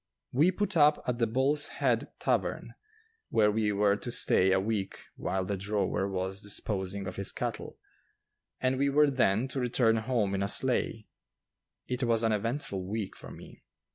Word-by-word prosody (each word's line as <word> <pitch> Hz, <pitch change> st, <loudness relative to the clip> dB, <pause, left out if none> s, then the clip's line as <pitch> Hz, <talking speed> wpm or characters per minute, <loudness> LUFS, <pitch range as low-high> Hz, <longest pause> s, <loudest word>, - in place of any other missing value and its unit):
We 150 Hz, +8 st, +4 dB
put 205 Hz, +1 st, -2 dB
up 150 Hz, -1 st, +4 dB
at 125 Hz, -1 st, -2 dB
the 115 Hz, -, +2 dB
Bull's 135 Hz, +6 st, +2 dB
Head -, -, 0 dB
Tavern, -, -, -1 dB, 0.6 s
where 105 Hz, -1 st, +3 dB
we 105 Hz, 0 st, +1 dB
were 100 Hz, 0 st, +3 dB
to 120 Hz, -, -6 dB
stay 95 Hz, -4 st, +3 dB
a 95 Hz, -, +4 dB
week 100 Hz, -1 st, -2 dB, 0.2 s
while 95 Hz, -1 st, -2 dB
the 100 Hz, -, -2 dB
drover 100 Hz, 0 st, -1 dB
was 95 Hz, +1 st, -3 dB
disposing 100 Hz, -1 st, -3 dB
of 90 Hz, -, -6 dB
his 100 Hz, 0 st, -1 dB
cattle, -, -, -5 dB, 0.8 s
and 130 Hz, 0 st, 0 dB
we 140 Hz, 0 st, +2 dB
were 145 Hz, +1 st, +4 dB
then 120 Hz, -2 st, +2 dB
to 135 Hz, -, -3 dB
return 120 Hz, -2 st, +2 dB
home 110 Hz, -3 st, 0 dB
in 100 Hz, -, -1 dB
a 100 Hz, -, 0 dB
sleigh. 115 Hz, -3 st, 0 dB, 0.8 s
It 125 Hz, 0 st, -3 dB
was 115 Hz, -2 st, +1 dB
an 115 Hz, -, +2 dB
eventful 110 Hz, -2 st, -2 dB
week 100 Hz, +1 st, -4 dB
for -, -, -11 dB
me. -, -, -13 dB
110 Hz, 170 wpm, -29 LUFS, 100-130 Hz, 0.8 s, We